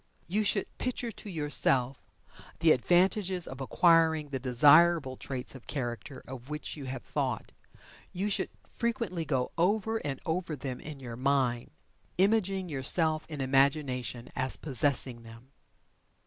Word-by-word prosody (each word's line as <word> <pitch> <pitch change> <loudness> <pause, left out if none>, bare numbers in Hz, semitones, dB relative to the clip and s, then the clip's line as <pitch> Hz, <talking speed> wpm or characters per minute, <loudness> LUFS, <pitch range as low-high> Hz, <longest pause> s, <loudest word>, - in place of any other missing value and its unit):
You 210 +5 0
should 200 -1 -1
picture 250 -2 -3
to 210 - -10
yourself 140 -5 +2 0.6
the 165 -1 +5
advantages 180 - +2
of 130 +1 -8
acquiring 160 +1 +3
the 135 -2 -3
desirable 145 +3 +5
traits 130 -1 -6
of 130 -3 -13
character 130 0 -5
of 130 0 -9
which 150 0 -5
you 145 -3 -8
have 130 -1 -6
thought. - - -3 0.6
You 190 +3 -2
should 205 - -1
frequently 230 -8 -3
go 130 -4 -1
over 215 +5 +1
and 140 - -4
over 165 -1 -2
them 130 -2 -6
in 150 -2 -9
your 120 -3 -8
mind, 130 -3 0 0.5
imaging 195 -1 +2
yourself 155 +2 +3
in 150 -3 -5
imagination 135 -2 0
as 130 0 -1
possessing 130 -3 0
them. 115 +3 -14
145 Hz, 135 wpm, -29 LUFS, 130-175 Hz, 0.6 s, the